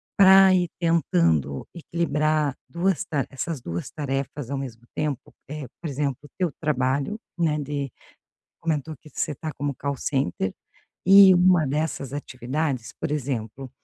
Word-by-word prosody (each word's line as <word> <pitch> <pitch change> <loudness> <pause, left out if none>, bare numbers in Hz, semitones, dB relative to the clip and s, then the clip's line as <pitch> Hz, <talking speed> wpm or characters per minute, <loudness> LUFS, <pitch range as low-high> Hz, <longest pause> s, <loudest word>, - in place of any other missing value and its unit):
para 190 -1 +8
ir 180 -2 +1
tentando 85 - +1
equilibrar 155 -3 0
2 180 +1 0
ta 145 -5 -1
essas 145 +2 -4
2 85 -6 -5
tarefas 140 -2 -3
ao 140 - -2
mesmo 120 -4 -6
tempo? 150 -4 -3 0.2
Eh, 150 -2 -5
por 165 - -3
exemplo, 140 -1 -2
o 145 - -13
teu 180 -4 0
trabalho, 140 - 0 0.2
né. 155 -3 +1
De 140 -2 -3 0.7
comentou 155 -2 -2
que 150 +3 -17
você 150 - -2
tá 155 +2 -5
como 145 0 -1
call 140 +1 -3
center, 95 -9 -1 0.5
e 195 0 +9
uma 180 -3 +5
dessas 145 -1 -2
atividades, 130 -1 -3
por - - -2
exemplo, 130 -3 -3
145 Hz, 145 wpm, -25 LUFS, 130-165 Hz, 0.7 s, e